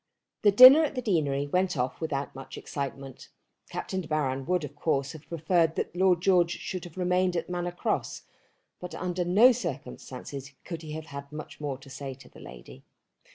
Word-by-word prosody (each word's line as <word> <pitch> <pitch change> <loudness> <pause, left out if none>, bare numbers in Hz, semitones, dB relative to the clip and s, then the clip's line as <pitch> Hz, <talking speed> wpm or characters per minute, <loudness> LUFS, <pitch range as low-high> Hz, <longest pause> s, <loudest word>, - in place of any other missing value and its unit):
The 210 - +6
dinner 255 +9 +10
at 300 - -2
the 255 - -2
deanery 145 -9 +1
went 180 +2 0
off 125 +4 -2
without 145 -3 -3
much 135 0 -9
excitement. 135 -2 -6 0.4
Captain 190 -1 -4
De 165 - -10
Baron 135 -3 -1
would 180 -2 +1
of 145 0 -7
course 140 -2 0
have 160 -2 -13
preferred 165 0 +1
that - - -3
Lord 180 -2 +3
George 180 -3 +4
should 185 -2 -5
have 175 0 -12
remained 180 0 +1
at 170 +1 -3
Manor 175 0 -2
Cross, 175 - -2 0.6
but 180 0 -7
under 180 0 -2
no 205 +9 +6
circumstances 140 - -6
could 170 -2 -6
he 155 -2 -8
have 160 0 -6
had 140 -1 -9
much 155 0 -9
more 140 -3 -3
to 135 +1 -15
say 135 -1 -6
to 135 - -16
the - - -16
lady. 65 +1 -12
160 Hz, 190 wpm, -28 LUFS, 140-180 Hz, 0.6 s, dinner